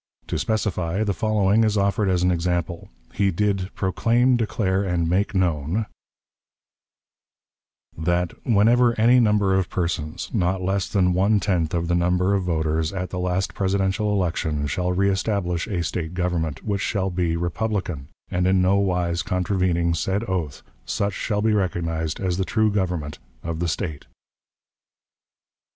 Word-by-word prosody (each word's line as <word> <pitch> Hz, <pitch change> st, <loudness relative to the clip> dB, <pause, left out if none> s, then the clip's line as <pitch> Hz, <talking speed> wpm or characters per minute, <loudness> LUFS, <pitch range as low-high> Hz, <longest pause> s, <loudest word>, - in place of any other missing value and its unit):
To -, -, -1 dB
specify, 100 Hz, -3 st, -1 dB
the 100 Hz, -2 st, 0 dB
following 110 Hz, 0 st, +2 dB
is 110 Hz, -1 st, +1 dB
offered 100 Hz, 0 st, +1 dB
as 90 Hz, -1 st, +1 dB
an 90 Hz, -, +3 dB
example. 85 Hz, 0 st, -2 dB, 0.2 s
He 100 Hz, -1 st, +2 dB
did 95 Hz, 0 st, 0 dB
"proclaim, 120 Hz, +6 st, +2 dB
declare, 100 Hz, -4 st, 0 dB
and 90 Hz, -3 st, 0 dB
make 100 Hz, +4 st, 0 dB
known 90 Hz, +3 st, 0 dB, 2.1 s
that, 85 Hz, +2 st, 0 dB
whenever 115 Hz, +2 st, +3 dB
any 120 Hz, +3 st, +6 dB
number 105 Hz, -4 st, +3 dB
of 95 Hz, -1 st, +1 dB
persons, 85 Hz, -1 st, -3 dB
not 95 Hz, -3 st, +1 dB
less 95 Hz, +1 st, -1 dB
than 90 Hz, -2 st, +2 dB
one 100 Hz, +4 st, +3 dB
tenth 90 Hz, -5 st, 0 dB
of 85 Hz, 0 st, -1 dB
the 85 Hz, -, +1 dB
number 90 Hz, +2 st, +2 dB
of 100 Hz, -, +2 dB
voters 80 Hz, -1 st, 0 dB
at 90 Hz, -2 st, -4 dB
the 90 Hz, -, -3 dB
last 90 Hz, 0 st, -1 dB
Presidential 95 Hz, +2 st, 0 dB
election, 80 Hz, -6 st, -1 dB
shall 90 Hz, +6 st, -1 dB
reestablish 95 Hz, -2 st, 0 dB
a 90 Hz, -6 st, -2 dB
State 85 Hz, 0 st, -4 dB
government, 85 Hz, -5 st, -2 dB
which 100 Hz, -2 st, -1 dB
shall 95 Hz, -3 st, -1 dB
be 85 Hz, -2 st, 0 dB
republican 85 Hz, -4 st, -2 dB
[!] -, -, -38 dB
and 90 Hz, 0 st, +1 dB
in 95 Hz, 0 st, +3 dB
no 95 Hz, +2 st, +3 dB
wise 90 Hz, -3 st, 0 dB
contravening 90 Hz, -2 st, 0 dB
said 95 Hz, +6 st, -1 dB
oath, 85 Hz, -8 st, -3 dB, 0.2 s
such 100 Hz, 0 st, -1 dB
shall 105 Hz, +1 st, -2 dB
be 110 Hz, -1 st, +3 dB
recognized 85 Hz, -5 st, -1 dB
as 90 Hz, -2 st, -1 dB
the 95 Hz, -, +1 dB
true 110 Hz, +2 st, +1 dB
government 90 Hz, -7 st, -2 dB, 0.2 s
of 85 Hz, -1 st, -4 dB
the 85 Hz, -, 0 dB
State." 80 Hz, -3 st, -4 dB
95 Hz, 150 wpm, -23 LUFS, 85-100 Hz, 2.1 s, any